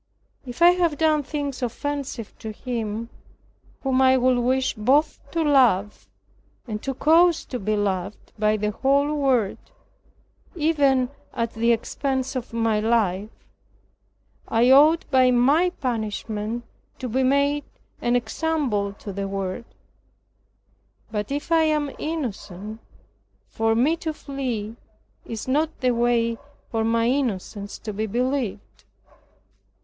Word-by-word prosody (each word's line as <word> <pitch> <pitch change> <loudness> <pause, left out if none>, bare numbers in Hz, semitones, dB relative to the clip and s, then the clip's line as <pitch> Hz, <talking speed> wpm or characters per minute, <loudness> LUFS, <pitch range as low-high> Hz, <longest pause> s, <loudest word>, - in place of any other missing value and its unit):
If 245 +7 -2
I 350 - +9
have 345 -4 +1
done 310 -2 +3
things 285 -1 -4
offensive 255 -2 -4
to 220 - -6
Him, 230 -1 -4 0.7
whom 265 -1 +2
I 260 0 +5
would 255 0 +3
wish 260 +2 +1
both 275 +8 +2
to 330 +2 0
love, 245 -9 +2 0.6
and 215 -2 -4
to 270 -1 -3
cause 330 +3 +4
to 250 - -5
be 215 +2 0
loved 200 -1 -3
by 215 0 +2
the 210 0 -1
whole 280 +6 +2
world, 260 -8 +1 1.0
even 285 -6 +2 0.3
at 230 0 -2
the 230 +1 +2
expense 265 +3 -1
of 250 -2 -4
my 225 -2 +1
life, 210 -3 +1 1.2
I 235 +3 +3
ought 305 +5 +6
by 260 -1 +5
my 275 +9 +4
punishment 225 - -3 0.3
to 255 - -5
be 255 +3 0
made 280 +2 +2 0.4
an 240 0 +1
example 245 -5 -1
to 200 0 -8
the 200 +1 -3
world; 195 +2 -4 1.5
but 210 +1 -3
if 290 +4 -4
I 330 -1 +5
am 300 -2 0
innocent, 220 - -5 0.7
for 225 0 0
me 285 +8 +2
to 320 -2 -4
flee 245 -7 -4 0.5
is 225 +1 -6
not 300 +4 0
the 255 -1 +3
way 235 -1 +1 0.3
for 225 -1 0
my 230 +1 +2
innocence 210 -6 -2
to 215 - -6
be 215 +2 -2
believed." 230 - -3
245 Hz, 130 wpm, -24 LUFS, 215-280 Hz, 1.5 s, I